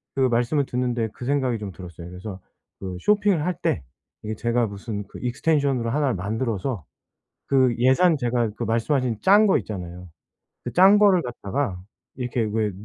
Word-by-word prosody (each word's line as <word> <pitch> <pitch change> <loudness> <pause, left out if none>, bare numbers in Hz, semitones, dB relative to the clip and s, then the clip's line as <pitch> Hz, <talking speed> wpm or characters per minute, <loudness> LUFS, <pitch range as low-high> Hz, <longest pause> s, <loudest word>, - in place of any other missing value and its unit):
그 135 - 0
말씀을 125 +3 +2
듣는데 125 -3 -1
그 125 - -8
생각이 130 -3 +1
좀 100 -2 -6
들었어요. 85 -1 -10
그래서 95 +2 -8 0.4
그 95 -2 -5
쇼핑을 205 -6 +2
할 180 - 0
때 75 - 0 0.4
이게 110 0 -4
제가 120 +2 +1
무슨 100 +1 -5
그 - - -11
extension으로 130 -1 0
하나를 140 -3 +1
만들어서 110 - -3 0.6
그 130 -3 +3
예산 130 +8 +4
제가 120 -3 0
그 - - -3
말씀하신 115 0 0
짠 205 +3 +6
거 190 - +4
있잖아요. 90 -3 -7 0.6
그 - - -4
짠 190 +3 +6
거를 200 -4 +5
갖다가 120 - -3 0.4
이렇게 125 -1 -2
왜 110 -1 0
120 Hz, 360 characters per minute, -24 LUFS, 105-140 Hz, 0.6 s, 짠